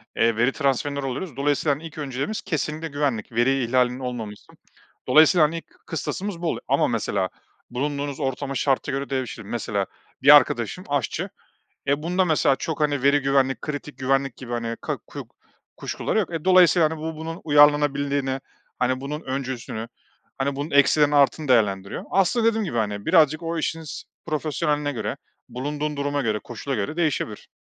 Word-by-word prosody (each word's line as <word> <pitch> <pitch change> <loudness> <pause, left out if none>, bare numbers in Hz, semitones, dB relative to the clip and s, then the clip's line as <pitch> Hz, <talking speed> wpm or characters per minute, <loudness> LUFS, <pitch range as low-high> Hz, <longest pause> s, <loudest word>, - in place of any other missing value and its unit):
eee, 115 -1 +3
veri 120 +4 +3
transferleri 140 0 -1
oluyor. 135 +3 -4
Dolayısıyla 145 +1 +1
ilk 160 -1 -9
önceliğimiz 140 +8 -3
kesinlikle 160 -2 -3
güvenlik, 140 -7 -2
veri 125 +3 +2
ihlalinin 125 +1 +1
olmaması 120 -5 -4
için. - - -21 0.5
Dolayısıyla 160 +1 +6
hani, 165 +2 -5
ilk - - -9 0.2
kıstasımız 180 +3 -4
bu 175 - -1
oluyor - - -2
ama - - +3
mesela 95 -2 -1 0.4
bulunduğunuz 140 +2 -3
ortama, 135 0 -2
şarta 135 0 +1
göre 140 +1 -3
değişir. 130 -5 -3
Mesela 105 -2 -2 0.4
bir - - +9
arkadaşım - - +2
aşçı - - -1 0.6
ya. 140 +2 +1
Bunda 180 +3 +1
mesela 155 -5 +3
çok 160 -1 -4
hani 145 -3 +1
veri 140 +1 +4
güvenlik, 135 -1 +2
kritik 145 -2 -6
güvenlik 135 0 0
gibi 120 -2 -8
hani 115 -1 -2
ka - - -2
ku - - -8 0.5
kuşkuları - - -2
yok. 185 -4 -1
E, 160 - -4
dolayısıyla 180 -3 +6
hani, 160 - -5
bu, 160 0 -4
bunun 165 +2 -6
uyarlanabilirliğini, 145 -2 +3 0.4
hani 130 +1 +1
bunun 150 +3 -4
öncüsünü, 130 -5 -4 0.6
bunun 145 +3 -4
eksilerini, 145 +1 +4
artılarını 145 +1 +3
değerlendiriyor. 100 -5 +1
Aslında 195 +5 +2
dediğim 225 -2 +2
gibi 120 - -4
hani, 105 -2 -2
birazcık 155 -2 +4
o 165 0 -2
işinizin 160 -1 -4 0.2
profesyoneline 150 -1 -1
göre, 115 - -3 0.3
bulunduğun 145 +3 -3
duruma 145 0 -1
göre, 110 -3 0
koşula 130 +3 -4
göre 105 +10 -3
değişebilir. 150 -10 -1
140 Hz, 160 wpm, -24 LUFS, 130-155 Hz, 0.6 s, bir